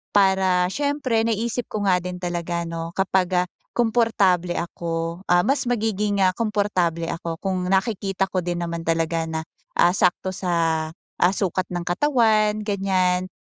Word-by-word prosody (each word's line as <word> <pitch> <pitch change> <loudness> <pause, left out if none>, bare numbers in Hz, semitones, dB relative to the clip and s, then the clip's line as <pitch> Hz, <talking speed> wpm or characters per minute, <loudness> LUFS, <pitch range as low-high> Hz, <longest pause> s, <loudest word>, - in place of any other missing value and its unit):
Para 190 -2 +4
siyempre 285 -3 0
naisip 230 +2 -1
ko 210 - -3
nga 185 -2 +4
din 180 0 -5
talaga 175 -1 -2
no 165 0 -5
kapag, 190 -1 +2 0.2
ah, - - -8 0.3
komportable 215 -7 +2
ako, 165 0 -3
ah, 175 +1 +4
mas 275 +3 +1
magiging, 210 -3 0
ah, 185 - +3
komportable 200 -7 0
ako 165 -1 -4
kung 190 -2 -1
nakikita 195 -1 0
ko 185 -1 -1
din 175 0 -2
naman 170 0 -4
talaga 165 0 0
na, 160 - -2 0.4
ah, 175 - +5
sakto 185 0 +1
sa 165 -4 0 0.4
sukat 185 -2 -1
ng 175 -1 -3
katawan 215 0 +2
ganyan. 185 -2 +1
185 Hz, 145 wpm, -23 LUFS, 175-210 Hz, 0.4 s, ah